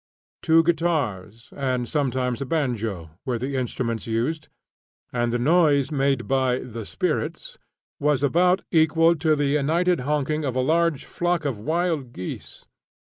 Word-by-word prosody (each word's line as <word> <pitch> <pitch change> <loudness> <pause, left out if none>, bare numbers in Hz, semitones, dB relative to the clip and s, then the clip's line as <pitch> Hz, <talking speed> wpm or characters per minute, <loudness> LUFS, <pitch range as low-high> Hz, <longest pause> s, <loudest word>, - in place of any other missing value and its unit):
Two 165 0 +4
guitars, 135 - -1
with 130 -3 -2
sometimes 130 -4 -1
a - - -1
banjo, 115 - -2
were 125 -2 -1
the 135 +4 -3
instruments 120 -3 -2
used, 125 +8 -2 0.6
and 120 -1 0
the 120 - +1
noise 145 0 +3
made 135 -4 0
by 130 -2 +2
"the 115 -4 -7
spirits" - - -3 0.4
was 145 -2 +1
about 180 +6 +3
equal 165 +1 +4
to 155 -1 +2
the 145 -1 0
united 160 +6 +2
honking 150 +3 -1
of 130 -3 -2
a - - +1
large 165 +1 +1
flock 175 -2 -1
of 130 -7 -2
wild 160 -1 -1
geese. 90 - -8
140 Hz, 140 wpm, -24 LUFS, 125-160 Hz, 0.6 s, Two